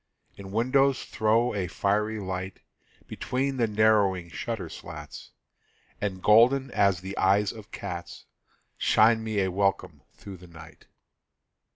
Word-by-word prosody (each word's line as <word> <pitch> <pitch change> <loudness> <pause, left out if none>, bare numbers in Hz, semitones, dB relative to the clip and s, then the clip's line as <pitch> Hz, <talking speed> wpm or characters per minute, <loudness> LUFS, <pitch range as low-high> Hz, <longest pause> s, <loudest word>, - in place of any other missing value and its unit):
Its 100 -1 -10
windows 130 +6 +2
throw 115 +3 +1
a 95 -3 -2
friendly 105 +4 -1
light 95 -1 -5 0.5
Between 135 +1 -3
the 115 -2 +2
narrowing 105 -5 +2
shutter - - -5
slats, - - -10 0.7
And, 95 -3 -3
golden 125 +5 +4
as 100 -3 +2
the 95 +1 -7
eyes 100 +1 +3
of 110 -2 -12
cats, 90 -4 -7 0.5
Shine 110 +1 +4
me 110 -2 -1
a 95 -1 0
welcome 100 +1 -1
through 100 -2 -10
the 90 +1 -15
night. 80 -2 -15
105 Hz, 130 wpm, -26 LUFS, 95-110 Hz, 0.7 s, golden